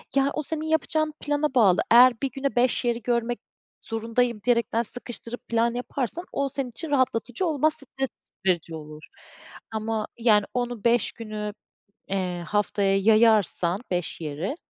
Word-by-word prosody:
ya 275 0 +4
o 305 - -2
senin 315 +2 -3
yapacağın 310 -1 +1
plana 290 0 -1
bağlı. 195 -7 +5
Eğer 245 +1 +8
1 275 - -1
güne 275 -1 -3
5 245 0 +2
yeri 235 0 0
görmek 240 0 -1 0.4
zorundayım 230 +1 -1
diyerekten; 235 -1 +2
sıkıştırıp 240 +1 -7
plan 235 0 +1
yaparsan 265 - -3
o 280 0 -1
senin 265 -1 -3
için 265 +7 -6
rahatlatıcı 255 +3 +1
olmaz, 310 -1 +2
stres 270 -1 -4 0.4
verici 170 -2 +1
olur 155 0 -9 0.7
ama 220 0 -2
yani 210 -3 +4
onu, 245 -3 -2
5 235 -1 +3
günü, 215 -2 -5 0.6
eee, 180 -3 -2
haftaya 200 -1 +1
yayarsan 215 -4 +4
5 175 -1 -2
yeri, 160 - -3
235 Hz, 145 wpm, -25 LUFS, 210-260 Hz, 0.7 s, Eğer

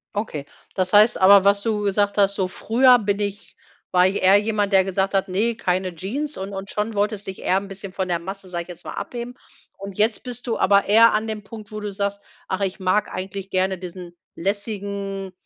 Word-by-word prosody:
Okay 180 -9 -3 0.3
das 185 0 -1
heißt 210 +3 +6
aber 195 +1 +7
was 200 0 +3
du 215 -1 -1
gesagt 205 0 0
hast: 200 -1 +3
„So 190 -2 0
früher 245 +6 +4
bin 200 -1 -1
ich 200 0 -5 0.4
war 180 0 +5
ich 195 - -1
eher 190 +2 +7
jemand 210 -1 0
der 190 -1 +6
gesagt 190 +1 -1
hat 195 +1 +2
‚ne 215 +5 0
keine 185 -3 -1
Jeans‘“, 270 - -4
und 195 +1 -6
und 195 0 -6
schon 210 +2 -2
wolltest 205 0 -1
dich 190 - -6
eher 185 - +2
'n 195 +1 -3
bisschen 195 0 -8
von 190 0 -2
der 175 -1 0
Masse 195 +2 -8
sage 175 -1 -3
ich - - -22
jetzt 175 - -11
mal - - -5
abheben 240 0 -6 0.4
und 195 -1 -8
jetzt 215 +1 +1
bist 245 -1 -7
du 230 - -1
aber 200 +1 +4
eher 225 +3 +6
an 215 +1 0
dem 215 -1 -5
Punkt, 215 0 -11
wo 215 - -5
du 210 -1 -5
sagst: 200 0 -3 0.3
„Ach, 190 +2 -3
ich 195 0 -2
mag 190 +2 +1
eigentlich 190 +1 -6
gerne 190 0 0
diesen 180 -1 -9 0.2
lässigen 200 0 -4
200 Hz, 220 wpm, -22 LUFS, 190-210 Hz, 0.4 s, aber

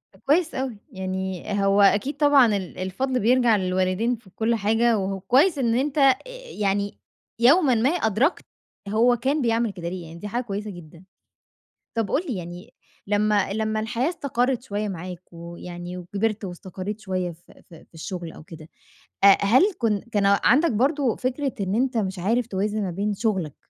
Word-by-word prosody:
ده - - -22
كويس 325 +3 +2
أوي، 260 -4 -3
يعني 190 -1 -4 0.2
هو 200 +1 +4
أكيد 205 +8 +3
طبعًا 280 -7 +5
ال 185 -2 -7
الفضْل 250 +8 -2
بيرجَع 240 0 +4
للوالدين 185 +5 0
في 215 -4 -18
كلّ 225 +4 0
حاجة 225 +2 +2
وهو 195 0 -2
كويس 285 - +3
إن 235 -3 +1
أنت 275 +4 -1
آآ، 275 -2 +6 0.4
يعني 200 0 0 0.4
يومًا 270 +2 +5
ما 230 +4 +2
أدرَكت 275 - +1 0.4
هو 235 +4 +4
كان 275 +5 0
بيعمل 230 -2 +1
كده 170 -3 -6
ليه، 180 -1 -6
يعني 165 +1 -11
دي 210 - -6
حاجة 240 +4 -2
كويسة 205 -1 -5
جدًا. 170 0 -13 0.9
طَب 225 -3 -1
قُل 300 - +1
لي، 245 - -2
يعني 175 0 -9 0.3
لمّا 205 -1 +1
لمّا 215 +1 -1
الحياة 235 +5 -1
استقرِّت 260 -6 -1
شوية 210 -3 -3
معاك، 180 -1 -6
ويعني 175 +1 -8
وكبِرت 205 +4 -2
واستقرّيت 190 +3 -6
شوية 185 -3 -2
في 165 +2 -20
في 165 -3 -16
في - - -36
الشغل 170 0 -6
أو - - -12
كده 160 0 -12 0.6
أ 200 -1 +8
هل 305 - +4
كن 215 -4 0
كان 205 -2 +1 0.2
عَندك 300 +5 +4
برضه 270 +2 +1
فكرة 260 +2 -2
إن 195 +1 -1
أنت 250 +1 0
مش 190 -3 -2
عارف 230 +6 0
توازن 210 +1 -2
ما 190 - -2
بين 200 +4 -1
شُغلك 190 - -2
210 Hz, 170 wpm, -24 LUFS, 185-245 Hz, 0.9 s, أ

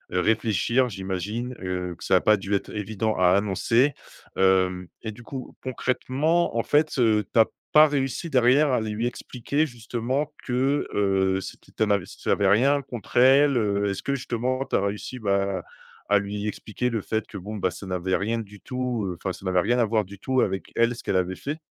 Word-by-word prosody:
heu, - - +3
réfléchir. 110 +3 +2
J'imagine, 100 +5 -4
heu, 90 -1 -3
que - - -12
ça - - +3
a - - +4
pas 110 -1 +4
dû 100 +1 -4
être 100 - -1
évident 110 +1 -2
à 90 -1 +4
annoncer, 115 +7 +2 0.4
hem 95 -1 +2
et 110 - -4
du 120 +3 -13
coup, 130 +1 -8
concrètement 130 +5 0
en 115 - +1
fait, 150 0 +2
heu, 110 -4 +3
tu 115 - +4
as 110 - +8 0.3
pas 155 0 +8
réussi 140 +3 -2
derrière 130 +3 +4
à 115 - +2
lui 110 +2 -2
expliquer 135 +5 -2
justement 125 +3 -3
que, 135 +3 0
heu, 95 -1 +2
c'était 95 - -10
un 105 - +1
invest 100 -4 -2
ça - - 0
avais 100 - +2
rien 135 +8 +4
contre 120 -6 -9
elle? 135 +3 +6
Heu, 100 -2 +1
est-ce 100 - -4
que 140 - -1
justement 130 +1 -2
tu - - -2
as - - +3
réussi, 105 +5 -4
bah, 100 -2 0 0.5
à 105 0 +5
lui 100 +1 -4
expliquer 110 +4 -3
le 115 -2 -1
fait 110 +2 -2
que, 100 - -8
bon, 105 +4 -7
bah, 95 -3 0
ça 95 - -9
n'avait 90 0 0
rien 115 +4 -1
du 105 -2 -9
tout, 125 -5 -3
heu, 90 -2 -4
enfin 95 - -2
ça 95 - -10
n'avait 90 -1 +2
rien 120 +6 +1
à 115 - +4
voir, 110 0 +1
du 100 +1 -12
tout 130 +2 +1
avec 95 0 -2
elle, 115 +1 +3
ce 120 - -10
qu'elle - - -1
avait 95 0 0
fait? 150 - -5
110 Hz, 210 wpm, -25 LUFS, 100-125 Hz, 0.5 s, as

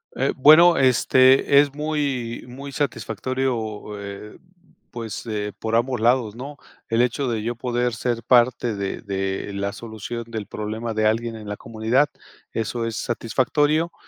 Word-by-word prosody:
Eh, 135 +2 0
bueno, 160 +6 +7
este 130 +1 +5
es 140 -1 -2
muy, 145 -6 -2
muy 135 +3 -9
satisfactorio, 125 -6 -3
eh, 100 +1 -8 0.5
pues, 115 -3 -6
eh, 105 -2 -3
por 110 0 -4
ambos 125 0 -1
lados, 115 -2 +2
¿no?, 140 +3 -8 0.3
el 115 0 +2
hecho 125 +2 0
de 115 -2 -1
yo 120 +2 -2
poder 120 0 -1
ser 115 +1 -2
parte 120 -1 +3
de 100 -1 -4
de 95 0 -3
la 100 0 -2
solución 115 +1 -7
del 110 -3 -5
problema 110 +2 -4
de 110 0 +2
alguien 115 +1 -1
en 105 -1 -10
la 105 - -4
comunidad. 115 +7 0 0.4
Eso 115 +1 -2
es 115 -1 -3
satisfactorio, 145 +8 0
120 Hz, 150 wpm, -23 LUFS, 110-130 Hz, 0.5 s, bueno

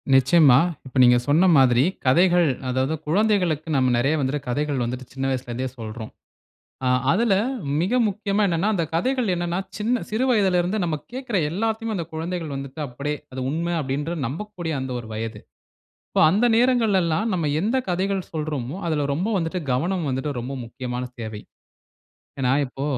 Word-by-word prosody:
நிச்சயமா. 135 0 +6 0.3
இப்ப, 130 - -13
நீங்க 125 0 +6
சொன்ன 160 +6 +4
மாதிரி 125 -2 +5 0.2
கதைகள் 175 +5 +4 0.2
அதாவது 130 +4 0
குழந்தைகளுக்கு 180 -4 +1
நாம 130 -2 +3
நெறைய 135 +6 +2
வந்து 135 +2 -1
கதைகள் 145 0 -1
வந்துட்டு 125 +2 -4
சின்ன 135 0 -3
வயசுல 130 -2 -3
இருந்தே 130 +2 -2
சொல்றோம். 110 0 -7 0.7
அ, - - +3 0.2
அதுல 225 +3 +3 0.5
மிக 185 +8 0 0.2
முக்கியமா 200 +1 -1
என்னன்னா 175 +2 0
அந்த 175 -5 0
கதைகள் 250 +4 +1
என்னன்னா 175 +1 -2 0.2
சின்ன 230 +3 0
சிறு 220 +5 0
வயதில 195 -7 +3
இருந்து 180 +5 -1
நம்ம 165 -3 0 0.2
கேக்குற 255 -5 -2
எல்லாத்தயுமே 220 +3 -1
அந்த 170 -3 -3
குழந்தைகள் 165 -1 -4
வந்துட்டு 135 +2 -7
அப்டீயே! 140 +3 -4 0.2
அது 130 - -6
உண்ம 170 +4 -1
அப்டீன்ற 145 +4 -2
நம்பக்கூடிய 175 - -5
அந்த 130 0 -4
ஒரு 115 - -9
வயது. 110 +1 -4 0.7
இப்போ, - - +1
அந்த 210 +7 +3
நேரங்கள்ல 235 -5 +3
எல்லாம் 170 +8 0
நம்ம 170 -4 -1
எந்த 220 +8 +1
கதைகள் 190 +1 -1
சொல்றோமோ, 150 -3 -3
அதுல 155 -3 0
ரொம்ப 180 +9 -1
வந்துட்டு 165 +1 -2
கவனம் 170 +5 0
வந்துட்டு 130 +3 -2
ரொம்ப 125 +3 -5
முக்கியமான 125 +1 -5 0.2
தேவை. 110 -2 -6 1.0
ஏன்னா, 125 -1 +2
இப்போ 135 +1 -6
160 Hz, 160 wpm, -23 LUFS, 130-190 Hz, 1.0 s, நிச்சயமா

